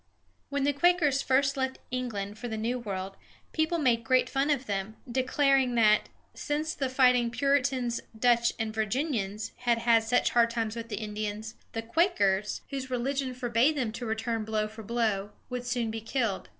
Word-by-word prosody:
When 280 Hz, -1 st, -1 dB
the 285 Hz, +1 st, +2 dB
Quakers 300 Hz, -3 st, +3 dB
first 270 Hz, +1 st, +2 dB
left 265 Hz, -1 st, -1 dB
England 215 Hz, -5 st, -3 dB
for 245 Hz, -, -5 dB
the 220 Hz, -2 st, -4 dB
New 235 Hz, +3 st, -1 dB
World, 195 Hz, -4 st, -5 dB, 0.3 s
people 315 Hz, +2 st, +1 dB
made 245 Hz, -7 st, +2 dB
great 255 Hz, +1 st, +2 dB
fun 275 Hz, +2 st, +1 dB
of 275 Hz, -3 st, +1 dB
them, 200 Hz, 0 st, -3 dB
declaring 260 Hz, 0 st, +2 dB
that, 215 Hz, -2 st, +4 dB, 0.2 s
since 305 Hz, +2 st, -2 dB
the 270 Hz, -2 st, -2 dB
fighting 250 Hz, -2 st, +4 dB
Puritans, 260 Hz, -2 st, +1 dB, 0.2 s
Dutch, 235 Hz, 0 st, +3 dB
and 220 Hz, -1 st, -2 dB
Virginians 220 Hz, -2 st, -2 dB
had 240 Hz, -2 st, +1 dB, 0.2 s
such 225 Hz, +3 st, +1 dB
hard 235 Hz, -1 st, +4 dB
times 225 Hz, -1 st, -2 dB
with 230 Hz, 0 st, -6 dB
the 210 Hz, -, -3 dB
Indians, 215 Hz, +1 st, -4 dB, 0.2 s
the 225 Hz, -, -3 dB
Quakers, 220 Hz, -, +1 dB
whose 265 Hz, -1 st, -4 dB
religion 255 Hz, +1 st, -1 dB
forbade 245 Hz, +4 st, +2 dB
them 240 Hz, -5 st, -1 dB
to 230 Hz, +2 st, -6 dB
return 225 Hz, 0 st, -2 dB
blow 215 Hz, 0 st, -1 dB
for 220 Hz, +1 st, -10 dB
blow, 215 Hz, -3 st, -1 dB, 0.2 s
would 250 Hz, 0 st, -4 dB
soon 240 Hz, -2 st, -1 dB
be 225 Hz, 0 st, -5 dB
killed. 225 Hz, -, -2 dB
240 Hz, 170 wpm, -29 LUFS, 220-265 Hz, 0.3 s, that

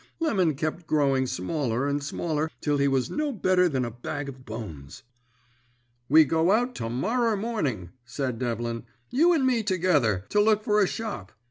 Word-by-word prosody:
Lemon 190 Hz, -, +1 dB
kep 155 Hz, +4 st, -3 dB
growing 135 Hz, -4 st, +2 dB
smaller 125 Hz, -, -2 dB
and 145 Hz, 0 st, -1 dB
smaller 155 Hz, +1 st, -2 dB
till 145 Hz, -1 st, 0 dB
he 140 Hz, -, +3 dB
was 135 Hz, -2 st, 0 dB
no 300 Hz, -1 st, -1 dB
better 185 Hz, -5 st, +2 dB
than 130 Hz, -4 st, -1 dB
a 120 Hz, -, -5 dB
bag 140 Hz, +5 st, -5 dB
of 130 Hz, -1 st, -10 dB
bones. 105 Hz, -, -8 dB, 1.1 s
"'We 155 Hz, +2 st, +7 dB
go 160 Hz, +5 st, +2 dB
out 245 Hz, +4 st, +2 dB
to 115 Hz, -, -3 dB
morrer 225 Hz, -, 0 dB
morning,' 150 Hz, -, -2 dB
said 120 Hz, 0 st, -4 dB
Devlin, 115 Hz, -1 st, -3 dB, 0.3 s
'you 320 Hz, +8 st, +4 dB
and 310 Hz, -6 st, +2 dB
me 250 Hz, -3 st, +2 dB
together, 160 Hz, -, +1 dB
to 210 Hz, -, +3 dB
look 215 Hz, 0 st, +3 dB
for 210 Hz, -1 st, +3 dB
a 195 Hz, -, +4 dB
shop. 205 Hz, -, -5 dB
150 Hz, 170 wpm, -26 LUFS, 125-210 Hz, 1.1 s, We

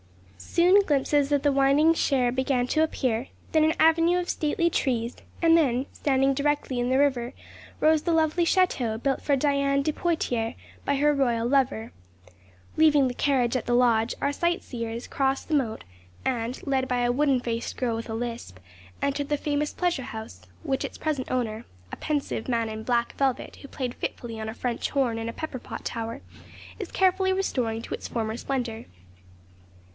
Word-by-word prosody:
Soon, 360 Hz, -, +4 dB
glimpses 290 Hz, -4 st, +1 dB
of 285 Hz, -1 st, +2 dB
the 290 Hz, -, +4 dB
winding 275 Hz, +4 st, +4 dB
Cher 260 Hz, -6 st, +1 dB
began 260 Hz, -1 st, +1 dB
to 310 Hz, -, +1 dB
appear, 255 Hz, -5 st, -1 dB, 0.2 s
then 315 Hz, -1 st, +4 dB
an 315 Hz, +1 st, +3 dB
avenue 330 Hz, +2 st, +4 dB
of 355 Hz, -, -3 dB
stately 330 Hz, +3 st, +1 dB
trees, 240 Hz, -6 st, -1 dB, 0.3 s
and 330 Hz, -1 st, +6 dB
then, 265 Hz, -5 st, +2 dB
standing 270 Hz, -1 st, +2 dB
directly 285 Hz, -2 st, 0 dB
in 245 Hz, 0 st, 0 dB
the 260 Hz, -, +3 dB
river, 260 Hz, -3 st, +1 dB, 0.5 s
rose 315 Hz, 0 st, +4 dB
the 340 Hz, -, -1 dB
lovely 325 Hz, +1 st, +2 dB
château 260 Hz, -, +1 dB
built 270 Hz, 0 st, 0 dB
for 285 Hz, -, +2 dB
Diane 280 Hz, 0 st, +2 dB
de 310 Hz, -, 0 dB
Poictiers 245 Hz, -10 st, -1 dB, 0.3 s
by 280 Hz, -, +1 dB
her 295 Hz, +2 st, +3 dB
royal 240 Hz, -4 st, +1 dB
lover. 255 Hz, -4 st, +1 dB, 0.8 s
Leaving 300 Hz, -4 st, +5 dB
the 250 Hz, -, -3 dB
carriage 255 Hz, -2 st, +1 dB
at 255 Hz, -, -2 dB
the 240 Hz, -, +2 dB
lodge, 235 Hz, -2 st, +3 dB
our 280 Hz, -, +1 dB
sight 345 Hz, +4 st, 0 dB
seers 230 Hz, -1 st, -5 dB
crossed 270 Hz, 0 st, -1 dB
the 320 Hz, -, -3 dB
moat, 250 Hz, -7 st, 0 dB, 0.4 s
and, 240 Hz, -1 st, -2 dB
led 265 Hz, -2 st, 0 dB
by 250 Hz, -1 st, 0 dB
a 240 Hz, 0 st, +2 dB
wooden 275 Hz, 0 st, +2 dB
faced 235 Hz, -1 st, -4 dB
girl 240 Hz, -3 st, 0 dB
with 230 Hz, +1 st, -6 dB
a 220 Hz, -, -3 dB
lisp, 230 Hz, -, -5 dB, 0.5 s
entered 280 Hz, 0 st, -1 dB
the 295 Hz, -, +1 dB
famous 295 Hz, 0 st, -1 dB
pleasure 350 Hz, -7 st, -1 dB
house, 220 Hz, -, -8 dB, 0.2 s
which 270 Hz, 0 st, -1 dB
its -, -, -6 dB
present 295 Hz, -5 st, -2 dB
owner 230 Hz, -3 st, -1 dB, 0.3 s
(a -, -, -4 dB
pensive 290 Hz, -6 st, -2 dB
man 230 Hz, -2 st, 0 dB
in 220 Hz, 0 st, -5 dB
black 235 Hz, 0 st, 0 dB
velvet, 270 Hz, -2 st, -1 dB
who 280 Hz, -, -11 dB
played 255 Hz, -3 st, -4 dB
fitfully 230 Hz, -2 st, -5 dB
on 220 Hz, 0 st, -4 dB
a -, -, -5 dB
French 245 Hz, -2 st, -2 dB
horn 250 Hz, -5 st, 0 dB
in 225 Hz, 0 st, -3 dB
a -, -, -5 dB
pepper 300 Hz, -3 st, -5 dB
pot -, -, -8 dB
tower) 230 Hz, 0 st, -4 dB, 0.6 s
is 395 Hz, -, -6 dB
carefully 380 Hz, 0 st, +2 dB
restoring 245 Hz, -12 st, -1 dB
to -, -, -6 dB
its -, -, -5 dB
former 220 Hz, -2 st, -2 dB
splendour. 240 Hz, -3 st, -3 dB
265 Hz, 180 wpm, -26 LUFS, 235-295 Hz, 0.8 s, and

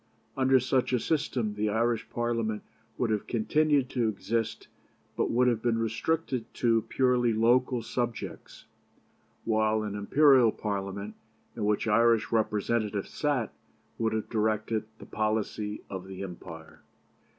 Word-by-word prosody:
Under 130 Hz, 0 st, +4 dB
such 130 Hz, +1 st, 0 dB
a 125 Hz, -, +3 dB
system 125 Hz, -7 st, -1 dB
the 105 Hz, +1 st, -1 dB
Irish 115 Hz, +1 st, 0 dB
Parliament 115 Hz, -3 st, -1 dB, 0.3 s
would 120 Hz, -3 st, 0 dB
have 105 Hz, -2 st, -1 dB
continued 145 Hz, +4 st, +2 dB
to 120 Hz, -4 st, +1 dB
exist, 115 Hz, +2 st, -2 dB, 0.5 s
but -, -, 0 dB
would 125 Hz, +2 st, +3 dB
have 115 Hz, -3 st, +1 dB
been 115 Hz, -1 st, +1 dB
restricted 120 Hz, +2 st, -1 dB
to 115 Hz, -2 st, +3 dB
purely 125 Hz, -3 st, +2 dB
local 120 Hz, +2 st, +2 dB
subjects, 120 Hz, 0 st, -5 dB, 0.8 s
while 110 Hz, -1 st, +2 dB
an 105 Hz, -2 st, -4 dB
Imperial 130 Hz, +3 st, +5 dB
Parliament, 100 Hz, 0 st, -4 dB, 0.4 s
in 110 Hz, -, -2 dB
which 105 Hz, +1 st, +1 dB
Irish 115 Hz, +1 st, +3 dB
representatives 105 Hz, -1 st, 0 dB
sat, 140 Hz, -7 st, -1 dB, 0.5 s
would 110 Hz, -1 st, +1 dB
have 110 Hz, -1 st, -2 dB
directed 110 Hz, 0 st, 0 dB
the -, -, -11 dB
policy 105 Hz, -1 st, -2 dB
of 95 Hz, -1 st, -7 dB
the 95 Hz, 0 st, -7 dB
empire." 85 Hz, -3 st, -10 dB
115 Hz, 130 wpm, -28 LUFS, 105-120 Hz, 0.8 s, Imperial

